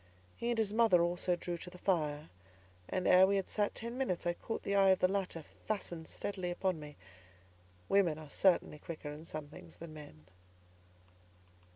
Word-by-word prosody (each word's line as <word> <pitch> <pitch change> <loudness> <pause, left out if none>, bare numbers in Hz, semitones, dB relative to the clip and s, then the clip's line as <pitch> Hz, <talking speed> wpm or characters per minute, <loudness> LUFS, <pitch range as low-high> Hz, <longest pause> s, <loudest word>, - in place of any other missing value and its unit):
He 235 - -2
and 240 - +1
his 215 -2 +1
mother 220 -7 +5
also 175 +1 +1
drew 175 0 -4
to 180 - -8
the 180 - -12
fire, 155 -6 0 0.6
and 185 -1 0
ere 185 +1 +8
we 200 - +2
had 195 -1 0
sat 205 -1 0
ten 235 +3 -5
minutes, 185 -11 -1
I 175 - +2
caught 225 - -5
the 200 - -1
eye 195 -1 +6
of 190 - +6
the 185 - +4
latter 185 -4 -2 0.2
fastened 175 -6 -3
steadily 185 -3 -4
upon 180 -1 -1
me. 150 -1 -9 0.9
Women 185 -6 +3
are 155 -1 -9
certainly 170 -1 +2
quicker 155 -2 -6
in 150 +2 -9
some 155 -2 -6
things 160 - -12
than 165 -1 -9
men. 110 - -12
180 Hz, 185 wpm, -34 LUFS, 160-200 Hz, 0.9 s, ere